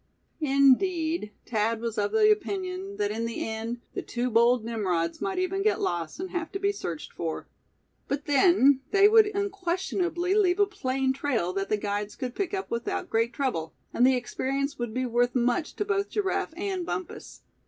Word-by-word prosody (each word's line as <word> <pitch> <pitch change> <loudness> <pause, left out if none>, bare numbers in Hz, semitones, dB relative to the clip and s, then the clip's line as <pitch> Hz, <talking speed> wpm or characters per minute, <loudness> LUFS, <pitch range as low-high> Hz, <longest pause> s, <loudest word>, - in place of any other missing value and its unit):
Indeed, 305 - +2
Thad 225 0 0
was 230 -1 -3
of 205 0 0
the 430 -1 +5
opinion 390 -1 -2
that 205 0 0
in 225 +2 -2
the 230 0 -3
end 225 +2 -4
the - - -3
two 245 +1 -3
bold 235 +1 +4
Nimrods 180 -8 -1
might 385 -1 -2
even 370 +1 0
get 430 +1 +2
lost, 175 - -2
and 370 0 -5
have 345 -3 -3
to 390 - -2
be 400 0 +2
searched 175 - -6
for. 160 -2 -4 0.6
But 280 +1 -2
then, 285 -2 +5
they 400 0 +6
would 435 0 +6
unquestionably 375 -3 -1
leave 390 -2 +3
a 405 - +6
plain 265 -9 -1
trail 245 -10 -1
that 195 0 -2
the 215 - +2
guides 205 0 -3
could 255 -3 -4
pick 385 +2 -2
up 390 -1 -4
without 235 0 -3
great 230 +1 +2
trouble; 165 - -2 0.2
and 240 - +2
the 260 0 +5
experience 275 +3 -2
would 240 -2 -2
be 255 +3 -1
worth 245 +1 +1
much 245 +5 0
to 415 - -2
both 400 0 0
Giraffe 390 -4 -1
and 380 -1 -2
Bumpus. 365 +1 -6
275 Hz, 185 wpm, -27 LUFS, 230-380 Hz, 0.6 s, they